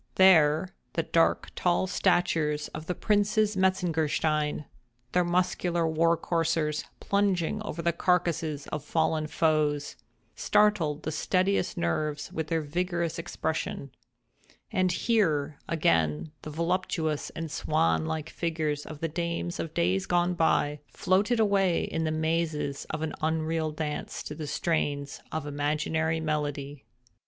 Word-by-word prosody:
There, 170 -2 +5 0.2
the 165 - 0
dark, 165 +1 +2
tall 175 +1 +2
statures 155 -5 +1
of 155 - -8
the 180 - -1
Princes 210 0 +2
Metzengerstein—their 155 -6 0
muscular 175 -1 +1
war 165 +1 +3
coursers 160 -2 0
plunging 200 0 +1
over 170 -6 -5
the 170 +1 +2
carcasses 165 -4 0
of 150 -2 -4
fallen 160 0 0
foes—startled 155 +3 0
the 155 - -2
steadiest 185 +5 +1
nerves 145 - -1
with 160 -1 -2
their 165 0 0
vigorous 170 +1 -2
expression; 160 -4 -3 0.8
and 185 -1 +2
here, 155 -9 +1
again, 80 - +1
the - - -7
voluptuous 165 -1 -1
and 165 -2 -4
swan 80 - +1
like 160 0 -3
figures 155 -3 -2
of 155 -2 -9
the 165 - 0
dames 170 +1 -3
of 160 - -4
days 90 +2 +1
gone 175 0 +2
by, 150 -3 +2
floated 200 +6 +1
away 195 -5 +3
in 165 0 -2
the 155 - 0
mazes 155 -3 -1
of 155 0 -3
an 160 - -2
unreal 160 0 0
dance 150 -1 -4
to - - -6
the 150 0 -6
strains 145 -2 -1
of 160 -2 -3
imaginary 155 +2 0
melody. 145 -4 -3
160 Hz, 125 wpm, -28 LUFS, 150-175 Hz, 0.8 s, There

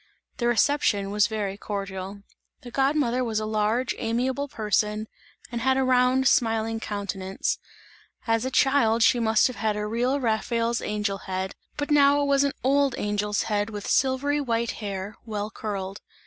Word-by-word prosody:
The 240 - 0
reception 230 -5 +2
was 205 -1 +3
very 205 -3 -3
cordial. 195 -1 -5 0.4
The 245 - -10
god 275 +3 +2
mother 255 -4 +1
was 225 -3 -1
a 215 - -3
large 215 +3 0
amiable 255 +5 -1
person 215 -2 -1 0.4
and 235 -1 -3
had 265 +2 +2
a 265 - +2
round 255 +1 +3
smiling 225 -3 +2
countenance; 200 -3 -3 0.7
as 225 0 +1
a 260 - -1
child 255 -4 +3
she 245 0 +4
must 220 -1 +3
have 255 - -1
had 215 0 0
a 210 - -2
real 245 +6 0
Raphael's 230 0 0
angel 205 -2 -2
head, 190 0 -2 0.2
but 290 +1 -3
now 285 -1 +5
it - - +1
was 280 0 +3
an 280 - 0
old 275 0 +3
angel's 210 0 -1
head 205 0 -1
with 205 -2 -6
silvery 280 +2 +1
white 235 -3 0
hair, 200 -1 -5
well 210 -2 -4
curled. 195 -2 -5
225 Hz, 165 wpm, -25 LUFS, 210-260 Hz, 0.7 s, now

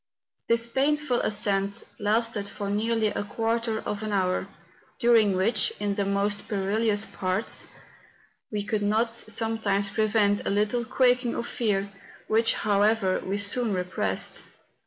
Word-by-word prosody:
This 230 0 +3
painful 275 +1 +1
ascent 200 -1 0 0.2
lasted 215 0 +1
for 200 -1 -5
nearly 220 +1 +1
a 205 - -3
quarter 225 +1 -1
of 210 0 -4
an 215 -1 -3
hour, 185 -2 0 0.5
during 230 -5 +4
which, 205 +3 +2
in 205 -1 -1
the 200 0 -1
most 200 +1 -1
perilous 205 +1 +1
parts, 185 +3 0 0.8
we 210 -1 -2
could 210 0 -1
not 220 +3 +1
sometimes 220 -3 -1
prevent 210 -1 +2
a - - -2
little 210 +4 +1
quaking 250 0 +2
of 235 - -3
fear, 200 -5 -1 0.4
which, 225 +1 +2
however, 205 -1 +2
we 195 +2 -2
soon 205 +2 +2
repressed. 180 0 -2
210 Hz, 135 wpm, -26 LUFS, 200-230 Hz, 0.8 s, during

